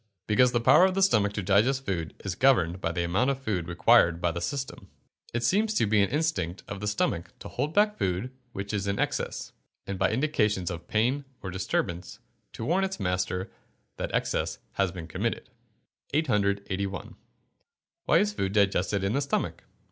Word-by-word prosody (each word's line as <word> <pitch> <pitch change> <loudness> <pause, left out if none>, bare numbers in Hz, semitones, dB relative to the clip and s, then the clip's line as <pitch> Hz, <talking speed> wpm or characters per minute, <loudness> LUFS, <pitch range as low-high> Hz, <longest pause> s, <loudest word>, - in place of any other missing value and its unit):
_ - - -43 0.2
Because 125 +3 +4
the 120 - +2
power 145 +9 +6
of 190 -1 +1
the 195 - +3
stomach 105 - +3
to 105 - -3
digest 115 +8 +2
food 85 -5 -3
is 100 - -1
governed 95 -7 +3
by 85 - 0
the 85 +1 -1
amount 95 +10 +1
of 135 -1 -1
food 100 -10 -2
required 85 0 +4
by 85 -1 +1
the 85 +1 -4
system. 135 +7 -4 0.4
It 120 0 -2
seems 210 - +2
to - - +3
be 105 0 +3
an 100 - +2
instinct 145 - -1
of 100 - -6
the 105 - -3
stomach 85 -4 -1
to - - -9
hold 145 +5 -3
back 210 0 +3
food 95 +7 -1 0.2
which 100 -1 -5
is 100 -1 -1
in 100 0 0
excess, - - -2 0.3
and 100 -1 -5
by 95 - +3
indications 105 - +1
of 85 -1 -7
pain 125 +6 +1 0.2
and 95 -2 -5
disturbance 90 -1 -2 0.4
to 115 - -5
warn 180 +7 +2
its 190 -6 -3
master 90 0 -1 0.5
that - - -3
excess - - -1
has 95 -2 0
been 85 -2 -7
committed. 80 - -3 0.6
881. 100 -7 -1 0.9
_Why - - +6
is 210 0 0
food 95 - -2
digested 100 -1 +2
in 100 +2 0
the 140 - +1
stomach? 140 - -2
100 Hz, 185 wpm, -27 LUFS, 90-130 Hz, 0.9 s, power